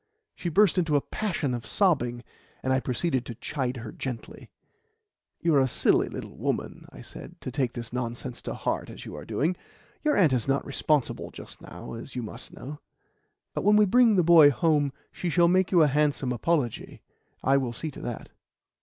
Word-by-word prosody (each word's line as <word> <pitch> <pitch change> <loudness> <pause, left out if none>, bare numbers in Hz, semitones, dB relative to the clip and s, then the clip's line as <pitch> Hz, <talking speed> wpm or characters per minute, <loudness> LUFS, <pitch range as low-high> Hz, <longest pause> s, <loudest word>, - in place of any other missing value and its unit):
She 175 - -4
burst 195 +2 +4
into 160 -4 +1
a 145 - +4
passion 170 -11 -2
of 120 -1 -4
sobbing, 125 - +1 0.4
and 130 - +1
I 130 - +3
proceeded 130 +1 -1
to 120 - -6
chide 125 +1 -3
her 115 -2 -7
gently. 125 -4 -7 0.9
"You 170 - +2
are 140 - +5
a 130 - +3
silly - - +2
little - - -8
woman," - - -3
I - - -11
said, - - -11
"to 130 - -5
take 130 -2 -1
this 120 -1 -7
nonsense 120 -1 -4
to - - -5
heart - - -2
as - - -10
you - - -8
are - - -8
doing. 170 +5 0 0.5
Your 300 -1 +2
aunt 165 -9 +5
is 125 -2 0
not 135 0 +1
responsible 145 0 0
just - - -11
now, - - -9
as 115 +4 -8
you 125 - -3
must 110 - -9
know; 145 +3 -9 0.7
but - - -3
when 210 +1 +5
we 210 0 +6
bring 230 +2 +5
the 180 - +4
boy 165 -3 +8
home 145 -1 +2 0.2
she 175 - -3
shall 170 +1 +4
make 185 +1 +2
you 175 -4 +6
a - - +5
handsome 145 -2 +1
apology. 125 -1 -1 0.4
I 135 +1 +4
will 130 -3 -1
see 155 +6 -5
to - - -10
that." 120 - -6
145 Hz, 200 wpm, -27 LUFS, 125-170 Hz, 0.9 s, boy